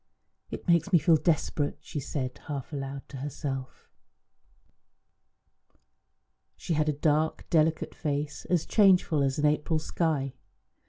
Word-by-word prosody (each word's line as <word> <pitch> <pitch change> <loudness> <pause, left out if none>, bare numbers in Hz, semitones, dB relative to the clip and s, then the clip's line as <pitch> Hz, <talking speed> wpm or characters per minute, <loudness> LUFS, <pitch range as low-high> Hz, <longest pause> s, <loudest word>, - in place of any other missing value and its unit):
"It - - -7
makes 170 +3 +3
me 175 - +7
feel 165 0 +4
desperate," 155 -2 0
she 150 0 -6
said 130 -1 -4
half 145 -1 -5
aloud 135 -1 -5
to 140 - -8
herself. 135 -1 -5 2.7
She 170 - -3
had 155 0 +1
a - - +1
dark, 155 +2 0
delicate 160 -1 +2
face, 145 0 -3
as 175 -3 +1
changeful 185 -7 +4
as 135 -1 +1
an 150 - +1
April 150 +2 +2
sky. 155 -4 -1
150 Hz, 125 wpm, -28 LUFS, 140-160 Hz, 2.7 s, me